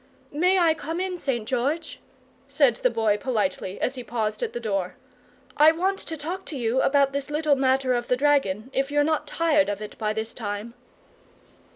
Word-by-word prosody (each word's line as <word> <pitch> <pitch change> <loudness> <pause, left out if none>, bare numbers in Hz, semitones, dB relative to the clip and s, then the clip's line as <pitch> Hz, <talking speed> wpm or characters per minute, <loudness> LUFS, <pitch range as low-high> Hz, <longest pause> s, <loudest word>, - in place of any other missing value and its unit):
"May 360 +6 +3
I 335 -3 +4
come 320 +2 -5
in, 370 0 -2
St. 255 -10 -3
George?" 280 +6 -2 0.5
said 265 -7 +3
the 250 - +2
Boy 220 -3 +1
politely, 205 -5 -2
as 255 - 0
he 255 -2 -7
paused 215 -3 -2
at - - -2
the 240 - -4
door. 195 -5 -2 0.6
"I 305 +2 +7
want 375 +4 -1
to 320 - -6
talk 345 +6 -5
to 295 - -6
you 240 +1 +1
about 280 -1 +3
this 280 0 -3
little 300 -1 +2
matter 265 -1 +2
of 240 -1 -1
the 250 - +1
dragon, 265 -5 +1
if 270 +1 0
you're 290 0 +2
not 310 +1 0
tired 310 -5 +2
of 205 -1 -3
it 210 -1 -8
by 215 -1 0
this 220 +1 -4
time." 210 +1 -5
265 Hz, 195 wpm, -25 LUFS, 225-305 Hz, 0.6 s, I